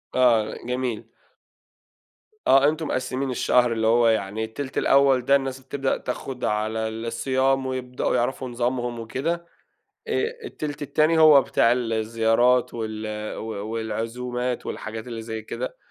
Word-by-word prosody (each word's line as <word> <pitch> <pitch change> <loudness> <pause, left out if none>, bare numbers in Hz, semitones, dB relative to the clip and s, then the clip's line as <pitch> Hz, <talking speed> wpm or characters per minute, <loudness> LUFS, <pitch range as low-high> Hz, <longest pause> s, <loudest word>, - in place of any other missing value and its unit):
آه، 115 -4 +3
جميل. 125 -2 -2 1.4
آه، 135 +2 +6
أنتم 155 0 -3
مقسِّمين 130 +1 -2
الشهر، 125 -1 +3
اللي 110 -1 0
هو 115 +1 +4
يعني 110 -1 0
التِلت 130 +5 -6
الأول 135 -2 +4
ده 140 +1 +5
الناس 135 -1 -1
بتبدأ 135 0 -2
تاخد 125 0 -5
على 110 +2 -1
ال 110 +1 -5
الصيام، 130 +3 +1
ويبدأوا 130 -1 -2
يعرفوا 125 +1 -1
نظامهم 120 0 -2
وكده. 165 +9 -3 0.6
آآ، 425 -1 +1 0.2
التِلت 150 - -5
التاني 155 +3 +2
هو 155 -3 +8
بتاع 115 -2 +3
الزيارات 115 +1 +2
وال 110 -1 -4 0.3
و 110 - -6 0.3
والعزومات 120 +3 -3
والحاجات 110 +2 -6
اللي 115 -2 -6
زي 110 -1 -5
كده. 115 +3 -5
125 Hz, 130 wpm, -24 LUFS, 115-135 Hz, 1.4 s, هو